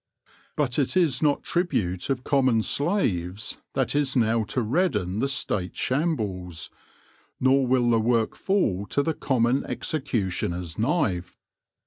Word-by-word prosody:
But 140 -2 0
it 145 +6 +1
is 165 -8 +2
not 145 -2 +2
tribute 95 - -1
of 130 -2 -1
com 135 -1 +2
mon 115 -4 +3
slaves 105 - -1 0.2
that - - 0
is 145 -2 0
now 115 -2 +2
to 125 +4 -1
redden 110 - 0
the 135 - +1
State 100 -9 -2
shambles, 105 - -2 0.7
nor 130 0 +3
will 120 -1 +3
the 115 - +4
work 115 0 +1
fall 110 - 0
to 145 - +1
the 160 - 0
common 130 -2 +1
executioner's 95 - -2
knife. 110 - 0
125 Hz, 135 wpm, -25 LUFS, 100-145 Hz, 0.7 s, the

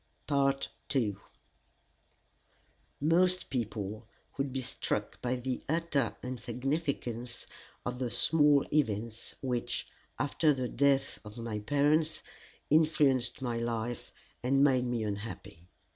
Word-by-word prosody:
II 110 -7 +2 1.8
Most 180 +5 +3
people 110 -3 -3 0.3
would 140 -1 -1
be 135 0 -2
struck - - -2
by 125 +1 0
the 125 0 -3
utter 155 -6 +1
insignificance 125 -1 -2 0.4
of 125 0 -3
the 125 -2 -1
small 145 +4 +4
events 115 -5 0
which, 125 -3 -1 0.3
after 150 +1 +2
the 130 -1 -1
death 135 0 +2
of 105 +1 -10
my 115 -2 -3
parents, 145 +6 +2 0.5
influenced 145 -4 +3
my 120 -2 -1
life 115 0 -3 0.3
and 135 +3 +3
made 130 -3 +4
me 120 -2 -1
unhappy. 100 -5 -6
125 Hz, 105 wpm, -31 LUFS, 115-145 Hz, 1.8 s, small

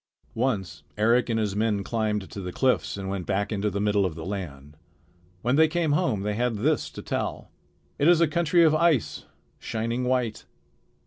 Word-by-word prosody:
Once 100 - -2 0.2
Eric 115 +4 +3
and 115 -1 +1
his 105 -3 -1
men 105 -2 0
climbed 105 -2 -1
the 95 -1 -7
cliffs 130 -1 0
and 95 -1 -5
went 95 -2 -4
back 100 +1 -1
into 105 0 0
the 100 0 -3
middle 105 -1 +2
of 90 -4 -2
the 80 -1 -7
land. 75 -8 -6 0.7
When 125 +4 +2
they 160 0 +6
came 165 -1 0
home 145 - +1
they 105 0 -1
had 120 +2 0
this 145 +8 0
to - - -8
tell: - - -4 0.5
"It 145 - +3
is 175 -1 +6
a 170 - +4
country 170 +2 +3
of 155 -2 +5
ice, 155 - +1 0.3
shining 115 +3 -2
white. 125 -3 -1
110 Hz, 185 wpm, -26 LUFS, 100-130 Hz, 0.7 s, they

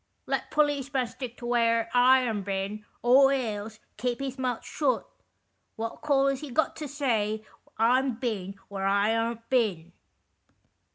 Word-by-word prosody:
Let - - -2
policeman 280 -3 +1
stick 245 0 -8
to 240 - -8
where 230 -1 +2
I 255 +1 +6
am 225 -5 -1
bin, 200 +2 -3 0.2
or 270 +3 +6
else 220 -4 -3 0.2
keep 245 +3 -2
his 270 -1 -4
mouth 250 -3 -2
shut. - - 0 0.7
What 225 +1 -5
call 280 -3 +3
Is 275 0 0
he 300 - -6
got 290 +6 +1
to 305 - -5
say 220 -7 -1 0.3
I'm 250 +3 +3
bin 210 -6 -3
where 195 -1 -3
I 200 +3 +3
aren't 230 0 -2
bin 195 -10 +1
240 Hz, 150 wpm, -28 LUFS, 215-265 Hz, 0.7 s, I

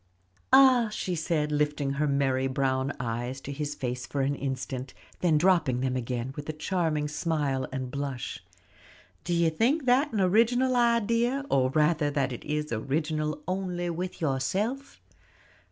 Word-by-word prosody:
"Ah," 260 -4 +6
she 190 -3 -3
said, 155 -2 -1
lifting 150 -1 0
her 150 +2 0
merry 135 -2 +1
brown 130 0 0
eyes 120 +2 -3
to 140 - -6
his 145 +1 -4
face 125 -2 -4
for 140 - -2
an 135 +1 +1
instant, 130 -1 -4 0.2
then 165 -4 +3
dropping 155 -7 +3
them 130 -1 0
again, 125 +1 -3
with 145 +1 -7
a - - -1
charming 155 -2 -1
smile 150 -4 -1
and 130 -1 -4
blush, 140 -2 -4 0.8
"do 175 - -4
you 170 -1 +3
think 255 - +1
that 260 +4 +3
an 215 - -1
original 235 +7 +3
idea, 235 +3 +2
or 130 -1 +3
rather 150 +1 +2
that 140 -2 -1
it 120 - -8
is 150 0 -3
original 150 +5 -2
only 180 -2 -2
with 180 +2 -5
yourself?" 190 - -2
150 Hz, 155 wpm, -28 LUFS, 135-185 Hz, 0.8 s, Ah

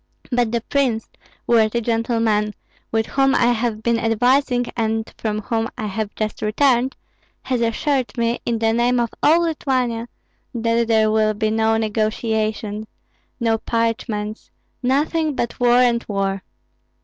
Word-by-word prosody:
But 240 -2 +1
the 235 0 0
prince, 245 -3 0 0.4
worthy 230 0 +3
gentlemen, 225 -2 0 0.4
with 225 0 +1
whom 270 +2 +2
I 240 0 +4
have 225 -2 -1
been 235 -1 +2
advising 245 +2 +2
and 225 -1 -1
from 215 -1 -2
whom 225 +1 -1
I 215 - -3
have 210 0 -4
just 215 -1 -3
returned, 250 +3 +2 0.5
has 255 -2 -1
assured 255 +3 0
me, 235 +1 0
in 235 -1 -1
the 225 0 +1
name 240 +1 +2
of 235 -1 0
all 325 +3 +5
Lithuania, 255 -7 -1 0.5
that 230 0 +1
there 220 -1 +3
will 215 -1 +2
be 215 +1 0
no 220 0 +2
negotiations, 215 -1 -1 0.5
no 225 -2 +1
parchments, 230 -2 -2 0.3
nothing 295 +4 +1
but 235 - -3
war 245 0 +4
and 240 -2 +3
war!" 195 -1 -1
230 Hz, 140 wpm, -21 LUFS, 220-245 Hz, 0.5 s, all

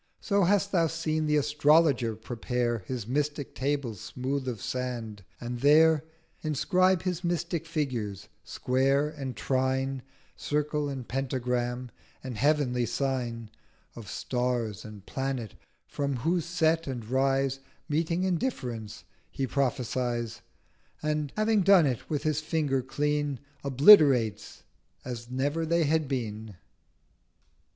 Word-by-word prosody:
So 200 -3 +2
hast 200 +1 +2
thou 170 -3 +3
seen 155 -1 -1
the 150 - +2
Astrologer 145 -4 +3
prepare 120 +1 -2
His 120 +3 -5
mystic 145 +3 -2
Table 140 -3 -1
smooth 130 +6 -4
of 120 -4 -3
sand, 120 -5 -4 0.2
and 120 0 -5
there 155 +2 +5 0.4
Inscribe 185 +4 +2
his 180 -1 -2
mystic 170 -1 -2
figures, 125 - -3 0.2
Square, 135 +3 +1
and 135 -5 -6
Trine, 130 +2 0 0.3
Circle 150 0 -1
and 130 -3 -6
Pentagram, 125 -2 -2 0.3
and 130 -3 -5
heavenly 125 -2 +1
Sign 120 -3 -2 0.4
Of 110 -4 -9
Star 125 -3 -1
and 105 -2 -11
Planet: 135 -6 -3 0.3
from 140 -1 -2
whose 165 +6 0
Set 165 -1 +1
and 120 -5 -5
Rise, 135 +1 +1 0.3
Meeting 165 +4 0
and 180 -3 +1
Difference, 120 - -4 0.3
he 135 - -2
prophesies; 125 -3 -1 0.6
1210 155 - 0
And, 150 -2 -2
having 215 -1 +3
done 190 -3 +6
it, 125 -4 -2
with 150 -2 -1
his 155 -1 0
Finger 155 -4 0
clean 145 +1 -1 0.2
Obliterates 140 - +5 0.4
as 120 -2 -6
never 145 +6 -1
they 170 +1 +2
had 155 0 +1
been. 110 -5 -4
135 Hz, 125 wpm, -28 LUFS, 125-155 Hz, 0.6 s, done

